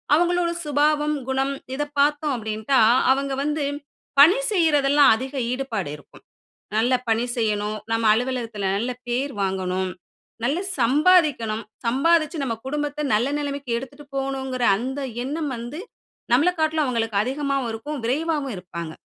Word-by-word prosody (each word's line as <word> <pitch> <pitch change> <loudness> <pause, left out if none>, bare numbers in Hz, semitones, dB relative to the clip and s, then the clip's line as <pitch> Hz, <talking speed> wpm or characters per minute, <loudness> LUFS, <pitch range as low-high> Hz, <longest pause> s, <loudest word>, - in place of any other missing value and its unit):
அவங்களோட 350 +1 +2
சுபாவம், 300 0 +1
குணம் 270 +1 0 0.2
இத 295 - -1 0.2
பார்த்தோம் 295 0 +2
அப்டின்டா 220 +3 0 0.3
அவங்க 275 0 -2
வந்து, 300 0 -1 0.5
பணி 340 - +8
செய்றதெல்லாம் 290 -6 +4
அதிக 260 +4 -6 0.2
ஈடுபாடு 250 - -3
இருக்கும். 145 - -19 0.5
நல்ல 235 +4 +2 0.2
பணி 225 +1 +2
செய்யணும், 215 -2 -1
நம்ம 225 0 +1
அலுவலகத்துல 230 -5 -2
நல்ல 240 +5 -1 0.2
பேர் 260 +3 -1
வாங்கணும், 190 -1 -1 0.5
நல்லா 280 +7 +1 0.2
சம்பாதிக்கணும். 260 -4 +3 0.2
சம்பாதிச்சு 315 +6 +2
நம்ம 230 -4 -2
குடும்பத்த 295 +1 -2
நல்ல 230 +5 +2
நிலைமைக்கு 280 -2 -4
எடுத்துகிட்டு 280 +2 -11
போகணுங்கிற 265 -2 -2
அந்த 260 +6 -4 0.2
எண்ணம் 295 +2 -3
வந்து, 240 +8 -6 0.5
நம்மள 295 +8 +4
காட்லும் 315 -1 +2
அவங்களுக்கு 225 -4 -1
அதிகமாவும் 275 -1 -1
இருக்கும், 285 +6 -5
விரைவாவும் 285 0 -1
இருப்பாங்க. 170 -3 -7
270 Hz, 125 wpm, -23 LUFS, 230-295 Hz, 0.5 s, பணி